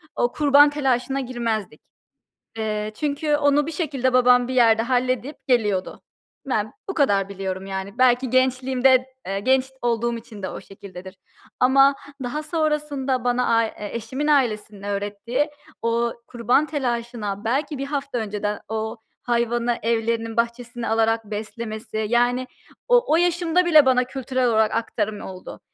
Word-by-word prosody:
o 240 Hz, 0 st, +1 dB
kurban 290 Hz, 0 st, +5 dB
telaşına 270 Hz, -2 st, 0 dB
girmezdik. 230 Hz, -, -3 dB, 0.8 s
Eee, 215 Hz, -1 st, -2 dB
çünkü 295 Hz, 0 st, 0 dB
onu 290 Hz, 0 st, +2 dB
bir 325 Hz, -, -4 dB
şekilde 270 Hz, -6 st, -1 dB
babam 250 Hz, 0 st, +5 dB
bir 260 Hz, -, -3 dB
yerde 225 Hz, -2 st, +5 dB
halledip 255 Hz, +3 st, -1 dB
geliyordu. 210 Hz, -7 st, 0 dB, 0.5 s
Ben 215 Hz, -5 st, -1 dB, 0.2 s
bu 385 Hz, -, -3 dB
kadar 200 Hz, -, +2 dB
biliyorum, 190 Hz, -1 st, -5 dB
yani. 195 Hz, +2 st, -6 dB
Belki 255 Hz, 0 st, +3 dB
gençliğimde, 255 Hz, 0 st, +3 dB, 0.2 s
eee, 195 Hz, +1 st, -2 dB
genç 260 Hz, +4 st, +3 dB, 0.2 s
olduğum 235 Hz, 0 st, 0 dB
için 220 Hz, -3 st, -12 dB
de 185 Hz, -, -2 dB
o -, -, -7 dB
şekildedir. 190 Hz, -1 st, -11 dB, 0.4 s
Ama 270 Hz, +2 st, +5 dB, 0.3 s
daha 280 Hz, +5 st, -3 dB
sonrasında 300 Hz, -5 st, -1 dB
bana, 245 Hz, -1 st, +2 dB
a 230 Hz, -, +3 dB
eşimin 235 Hz, +7 st, -4 dB
ailesinin 220 Hz, -8 st, +1 dB
öğrettiği 205 Hz, +8 st, -2 dB, 0.3 s
o 230 Hz, 0 st, +1 dB
kurban 245 Hz, +5 st, +1 dB
telaşına 235 Hz, -7 st, -3 dB
belki 280 Hz, +5 st, -1 dB
1 275 Hz, -, -3 dB
hafta 280 Hz, -3 st, -3 dB
önceden 210 Hz, -1 st, -3 dB
o 220 Hz, +1 st, -3 dB, 0.3 s
hayvanı 240 Hz, 0 st, 0 dB
evlerinin 230 Hz, 0 st, -1 dB
bahçesine 235 Hz, 0 st, -2 dB
alarak 225 Hz, 0 st, +1 dB
beslemesi, 215 Hz, +1 st, -5 dB
yani, 245 Hz, +2 st, +2 dB, 0.4 s
o -, -, +5 dB
o -, -, +6 dB
yaşımda 350 Hz, 0 st, +2 dB
bile 310 Hz, -5 st, +6 dB
bana 255 Hz, -1 st, +4 dB
kültürel 255 Hz, 0 st, -2 dB
olarak 220 Hz, -1 st, +2 dB
aktarım 215 Hz, -2 st, -2 dB
oldu. 185 Hz, -1 st, -9 dB
240 Hz, 140 wpm, -23 LUFS, 220-270 Hz, 0.8 s, o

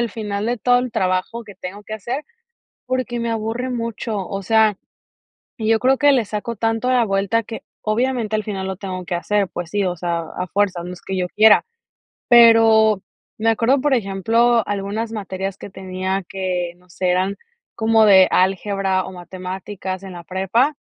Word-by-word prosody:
el 235 Hz, -2 st, -1 dB
final 210 Hz, -1 st, -4 dB
de 240 Hz, 0 st, -1 dB
todo 245 Hz, +1 st, +3 dB
el 250 Hz, -2 st, -3 dB
trabajo 185 Hz, +3 st, -1 dB
que 205 Hz, -4 st, -13 dB
tengo 195 Hz, +3 st, -8 dB
que 215 Hz, -, -6 dB
hacer, 245 Hz, +8 st, -4 dB, 0.6 s
porque 255 Hz, -2 st, -2 dB
me 235 Hz, 0 st, -2 dB
aburre 225 Hz, +3 st, -2 dB
mucho, 230 Hz, -2 st, -3 dB
o 195 Hz, 0 st, -4 dB
sea, 220 Hz, 0 st, +3 dB, 0.8 s
y 220 Hz, -1 st, -3 dB
yo 225 Hz, 0 st, +3 dB
creo 260 Hz, +1 st, +3 dB
que 290 Hz, -1 st, +5 dB
le 250 Hz, -4 st, +3 dB
saco 215 Hz, +3 st, -4 dB
tanto 225 Hz, +3 st, 0 dB
la 245 Hz, -2 st, +4 dB
vuelta 200 Hz, +3 st, 0 dB
que, 225 Hz, +1 st, -8 dB, 0.2 s
obviamente, 225 Hz, 0 st, 0 dB
al 215 Hz, -, -1 dB
final 195 Hz, -2 st, -4 dB
lo 190 Hz, -1 st, -4 dB
tengo 185 Hz, -2 st, -5 dB
que 175 Hz, -, -2 dB
hacer, 200 Hz, +2 st, 0 dB
pues 175 Hz, -1 st, -6 dB
sí, 205 Hz, -1 st, 0 dB
o 180 Hz, -1 st, -1 dB
sea, 170 Hz, 0 st, -2 dB, 0.2 s
a 180 Hz, 0 st, -3 dB
fuerzas, 185 Hz, -3 st, 0 dB
no 180 Hz, -, -6 dB
es 175 Hz, -, -12 dB
que 190 Hz, -1 st, -4 dB
yo 180 Hz, -1 st, -1 dB
quiera. 215 Hz, 0 st, +6 dB, 0.6 s
Pero 225 Hz, -3 st, +6 dB, 0.4 s
me 225 Hz, +1 st, +1 dB
acuerdo, 240 Hz, +5 st, +2 dB
por 285 Hz, 0 st, +1 dB
ejemplo, 230 Hz, +2 st, +2 dB
algunas 205 Hz, +3 st, -3 dB
materias 195 Hz, -2 st, -4 dB
que -, -, -9 dB
tenía 190 Hz, 0 st, -3 dB
que 180 Hz, -2 st, -3 dB
no 180 Hz, 0 st, -27 dB
sé, 180 Hz, +1 st, -2 dB
eran 190 Hz, +2 st, 0 dB, 0.4 s
como 225 Hz, -1 st, +4 dB
de 190 Hz, -2 st, +7 dB
álgebra 190 Hz, 0 st, +1 dB
o 190 Hz, -, -8 dB
matemáticas 185 Hz, +1 st, -6 dB
en 190 Hz, -2 st, -8 dB
la 175 Hz, -1 st, -9 dB
prepa, 195 Hz, -, 0 dB
205 Hz, 185 wpm, -20 LUFS, 190-230 Hz, 0.8 s, de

